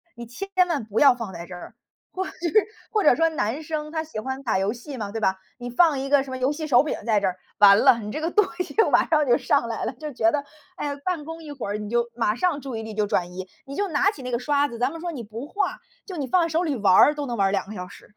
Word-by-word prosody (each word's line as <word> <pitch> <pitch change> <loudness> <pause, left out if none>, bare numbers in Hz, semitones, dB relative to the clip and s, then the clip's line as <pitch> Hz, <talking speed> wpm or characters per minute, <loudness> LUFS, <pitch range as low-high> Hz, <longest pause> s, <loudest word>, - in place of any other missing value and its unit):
你 235 - -8
千 240 - -7 0.2
万 290 -10 -1
不 215 0 -1
要 275 -4 +7
放 230 -6 -6
在 170 0 -7
这 185 - -8
儿。 175 - -11 0.4
或 375 - -3
者 - - -7 0.6
或 425 -2 +1
者 295 - +6
说 330 +1 +3
男 275 -3 -2
生 305 -1 -4
他 315 0 -2
喜 305 -8 -6
欢 265 +2 -4
打 225 -6 +1
游 195 +2 +1
戏 255 +4 -8
嘛， 210 -4 -5
对 225 - -4
吧？ 190 -3 +1 0.2
你 245 0 -6
放 290 +2 +3
一 270 - -3
个 280 -1 +4
什 265 - -9
么 260 - -3
游 255 +2 +1
戏 310 +1 -4
手 255 -4 +5
柄 305 - -2
在 220 -3 +3
这 200 - 0
儿， 180 - -2 0.2
完 200 -1 +8
了， 230 - +6
你 210 -1 -6
这 305 +7 -4
个 330 +2 -1
东 420 -2 +4
西 360 - -3 0.2
马 - - +4
上 305 -3 +2
就 240 - +5
上 280 -5 +1
来 225 - -4
了， - - -1
就 300 -3 -7
觉 335 +7 +2
得， 295 - 0 0.4
哎 - - -3
呀， 285 -1 -3
办 350 -5 -2
公 325 +1 -8
一 295 - -8
会 270 -7 -6
儿 205 - -2
你 210 -1 -6
就 235 +1 +1
马 225 -3 +1
上 310 0 0
注 260 -5 -5
意 225 - -5
力 220 -1 -7
就 210 0 0
转 180 -3 -1
移， 185 +1 -7 0.2
你 275 - -8
就 405 +3 -1
拿 360 +5 +3
起 285 - -11
那 250 0 -5
个 235 - 0
刷 285 +3 +2
子， 235 -1 -8
咱 250 +2 +1
们 330 - -8
说 350 - -3
你 255 -7 -6
不 225 +5 -7
画， 405 +6 -2 0.3
就 375 - -7
你 290 - -2
放 360 +7 +3
在 335 - +1
手 330 +2 0
里 290 -6 -1
玩 195 -3 +4
儿 295 - +7
都 290 - -3
能 240 -3 -3
玩 195 -2 +2
2 195 - 0
个 215 - -8
小 180 -2 -6
时。 - - -15
265 Hz, 325 characters per minute, -24 LUFS, 220-310 Hz, 0.6 s, 完